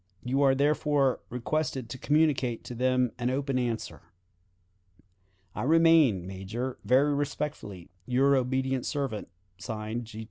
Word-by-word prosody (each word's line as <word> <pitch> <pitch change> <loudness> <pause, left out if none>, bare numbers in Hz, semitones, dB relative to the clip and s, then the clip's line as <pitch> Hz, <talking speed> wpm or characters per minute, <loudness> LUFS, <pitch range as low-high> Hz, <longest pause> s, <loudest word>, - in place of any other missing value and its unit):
You 130 +3 0
are 135 -1 +4
therefore 145 -1 +2
requested 130 +1 -2
to 130 - -6
communicate 145 -6 +1
to 125 0 -7
them 125 0 +1
an 120 0 0
open 135 0 -1
answer. 115 - -3 1.5
"I - - -5
remain, 155 - +4
Major, 95 +7 -5
very 140 +3 +3
respectfully, 140 - -4 0.2
"Your 135 +3 +3
obedient 130 0 0
servant, 135 -8 -3 0.3
(Signed) 110 +1 -5
"G. 110 0 -11
T. - - -6
130 Hz, 130 wpm, -28 LUFS, 120-140 Hz, 1.5 s, are